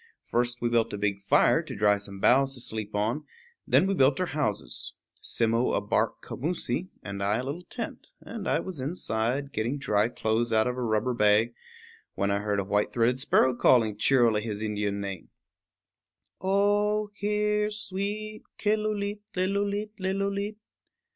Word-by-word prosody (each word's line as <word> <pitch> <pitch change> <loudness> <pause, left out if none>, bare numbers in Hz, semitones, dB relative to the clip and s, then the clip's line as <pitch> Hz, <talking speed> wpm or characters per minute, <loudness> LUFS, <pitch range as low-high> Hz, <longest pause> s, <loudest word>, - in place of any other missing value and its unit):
First 120 0 -1
we 120 - +2
built 115 -1 +2
a - - -2
big 100 -1 -1
fire 100 - +4
to - - -8
dry 105 0 +3
some 100 -1 -9
boughs 135 +5 +4
to - - -6
sleep 110 -3 -3
upon; 110 +8 -1 0.4
then - - +5
we 195 - +1
built 135 -4 +3
our 185 - +1
houses, 125 - -1 0.3
Simmo 115 +1 +1
a - - +2
bark 105 - -1
commoosie, 175 +4 -2
and 100 -1 -5
I 100 +2 +1
a 125 - -2
little 145 +6 -4
tent; 230 +6 -7
and 225 -3 -7
I - - +2
was 185 -6 -7
inside, 135 -2 -1
getting 115 +6 -1
dry 105 -5 +1
clothes 115 0 0
out 110 -1 +4
of 125 - -1
a 125 - -4
rubber 115 +1 +1
bag, 105 +1 +3 0.6
when 100 +1 0
I 100 - +1
heard 105 -1 -1
a - - 0
white 105 +2 0
throated 120 +2 +2
sparrow 130 -1 +3
calling 115 -3 +4
cheerily 115 -1 +3
his 105 -1 -4
Indian 105 -1 -2
name, 100 -2 -6 1.1
_O 205 +2 +2
hear, 210 +1 0
sweet 210 +1 -4 0.2
Killooleet 210 -1 0 0.2
lillooleet 200 +3 0
lillooleet! 200 +2 -1
125 Hz, 160 wpm, -27 LUFS, -, 1.1 s, then